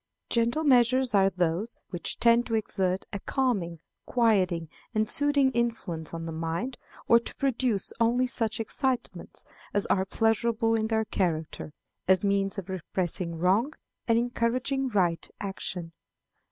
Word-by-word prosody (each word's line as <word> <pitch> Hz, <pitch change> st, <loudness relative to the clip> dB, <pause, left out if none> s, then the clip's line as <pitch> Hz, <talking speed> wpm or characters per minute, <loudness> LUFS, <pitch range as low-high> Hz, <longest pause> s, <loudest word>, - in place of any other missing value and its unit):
Gentle 235 Hz, +6 st, +1 dB
measures 255 Hz, -2 st, +4 dB
are 195 Hz, -1 st, +5 dB
those 180 Hz, +4 st, -1 dB, 0.2 s
which 175 Hz, -2 st, -3 dB
tend 235 Hz, +1 st, +4 dB
to 225 Hz, -, 0 dB
exert 190 Hz, -3 st, 0 dB
a 200 Hz, -, -2 dB
calming, 195 Hz, -, -1 dB, 0.3 s
quieting, 190 Hz, -9 st, +2 dB, 0.3 s
and 215 Hz, 0 st, +2 dB
soothing 285 Hz, 0 st, +3 dB
influence 225 Hz, -9 st, -2 dB
on 165 Hz, 0 st, -5 dB
the 165 Hz, -, -4 dB
mind, 165 Hz, +10 st, -3 dB, 0.3 s
or 235 Hz, -, +7 dB
to 235 Hz, -, -8 dB
produce 250 Hz, -6 st, 0 dB
only 240 Hz, +2 st, +3 dB
such 230 Hz, -4 st, -1 dB
excitements 250 Hz, +2 st, -2 dB, 0.3 s
as 205 Hz, -, +3 dB
are 190 Hz, -1 st, +1 dB
pleasurable 225 Hz, +2 st, +1 dB
in 220 Hz, -1 st, +1 dB
their 220 Hz, 0 st, +1 dB
character, 160 Hz, -6 st, -2 dB, 0.4 s
as 190 Hz, +1 st, +4 dB
means 200 Hz, 0 st, +1 dB
of 195 Hz, -2 st, -5 dB
repressing 180 Hz, -1 st, -3 dB
wrong 200 Hz, -, +2 dB, 0.3 s
and 230 Hz, -1 st, +4 dB
encouraging 245 Hz, +3 st, 0 dB
right 180 Hz, -6 st, +1 dB
action. 185 Hz, -3 st, -4 dB
220 Hz, 140 wpm, -28 LUFS, 185-240 Hz, 0.4 s, or